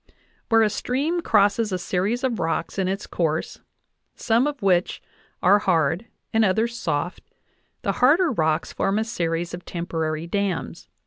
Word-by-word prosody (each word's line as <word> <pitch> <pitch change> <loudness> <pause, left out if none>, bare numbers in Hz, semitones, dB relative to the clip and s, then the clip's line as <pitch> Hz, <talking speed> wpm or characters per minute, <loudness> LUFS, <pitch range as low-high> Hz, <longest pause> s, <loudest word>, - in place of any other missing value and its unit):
Where 225 -1 +5
a 215 - +3
"stream 290 - -1
crosses 210 -4 +2
a 185 - 0
series 195 +7 -1
of 245 -4 0
rocks 165 +4 -2
in 190 - +1
its 195 +2 -2
course, 160 -2 -2 0.6
some 235 +4 +2
of 290 -2 -4
which 180 -2 +2 0.4
are 200 +3 +6
hard 170 +1 +1 0.3
and 225 0 +4
others 220 +4 +1
soft, 165 -2 -2 0.6
the - - +1
harder 310 +6 +5
rocks 160 -6 0
form 195 +1 0
a 220 - +1
series 170 -6 -2
of 175 0 -6
temporary 160 -2 -3
dams 195 0 -3
195 Hz, 150 wpm, -23 LUFS, 170-230 Hz, 0.6 s, are